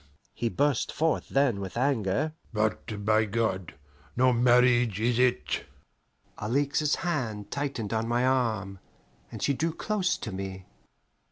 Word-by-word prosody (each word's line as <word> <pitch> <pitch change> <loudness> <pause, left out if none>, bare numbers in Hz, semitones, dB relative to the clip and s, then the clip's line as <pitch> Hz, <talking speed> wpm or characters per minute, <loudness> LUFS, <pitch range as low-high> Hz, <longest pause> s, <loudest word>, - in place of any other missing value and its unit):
he 115 - -1
burst 140 0 +1
forth 160 0 0
then 135 -7 +2
with 95 +2 -6
anger. 130 +2 +1 0.2
"But, 105 -1 -2
by 110 +1 +4
God! 100 -5 -2 0.4
no 130 0 +4
marriage 120 -3 +4
is 120 +1 +1
it!" 120 -12 +1 0.7
Alixe's 140 +6 +1
hand 110 - -2
tightened 135 -7 -3
on 110 0 0
my 120 +2 +1
arm, 110 -7 0 0.5
and - - -6
she 140 - +2
drew 160 +4 -1
close 195 -1 0
to 110 - -6
me. 95 -1 -6
120 Hz, 135 wpm, -28 LUFS, 105-135 Hz, 0.7 s, by